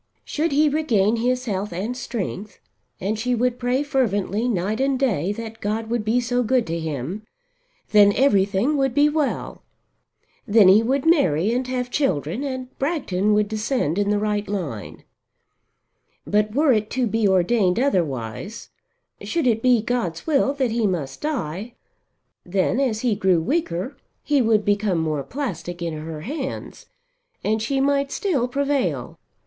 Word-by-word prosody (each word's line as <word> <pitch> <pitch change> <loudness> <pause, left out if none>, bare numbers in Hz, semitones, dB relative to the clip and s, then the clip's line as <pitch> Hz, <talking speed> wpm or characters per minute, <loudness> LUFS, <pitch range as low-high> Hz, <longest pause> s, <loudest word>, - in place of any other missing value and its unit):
Should 315 +1 -1
he 300 +2 +4
regain 235 -8 +2
his 250 +2 0
health 205 -2 -2
and 200 +8 -3
strength, 215 -4 -5 0.4
and 210 +3 -2
she 250 +2 0
would 245 +1 0
pray 250 +3 +1
fervently 225 -5 0
night 210 +3 -1
and 270 0 +1
day 205 - 0
that 225 0 -8
God 220 +2 -2
would 235 -2 0
be 220 +3 +2
so 245 +1 0
good 250 0 +2
to 165 0 -3
him, 160 - -4 0.7
then 205 -1 +7
everything 210 +2 +2
would 270 -3 0
be 290 +1 +5
well. 300 -2 -2 0.9
Then 205 -3 +6
he 200 +3 +7
would 265 +5 0
marry 215 - +3
and 250 +1 -1
have 250 -1 -3
children, 190 - -1
and 260 -2 -5
Bragton 215 - 0
would 210 0 +2
descend 215 - -1
in 205 0 +1
the 210 - +2
right 210 0 -1
line. 160 - -5 1.2
But 210 +1 +1
were 290 -2 +4
it 215 -1 0
to 255 - +2
be 225 -1 +1
ordained 190 +1 +2
otherwise, 170 - -2 0.5
should 335 -4 -1
it 225 -3 +2
be 245 -3 +3
God's 220 -9 -2
will 280 -3 +2
that 260 -4 0
he 225 -2 +1
must 150 -8 -3
die, 235 - -3 0.7
then, 190 +7 0
as 235 -6 0
he 245 -3 +2
grew 190 -4 +2
weaker, 190 - -2 0.3
he 290 -2 +2
would 220 -3 +2
become 205 -2 +1
more 155 -3 -1
plastic 175 - -5
in 170 -2 -3
her 155 0 -6
hands, 270 - -6 0.6
and 220 +1 0
she 270 +5 0
might 280 0 +1
still 290 -12 0
prevail. 280 +1 -1
225 Hz, 155 wpm, -22 LUFS, 190-260 Hz, 1.2 s, then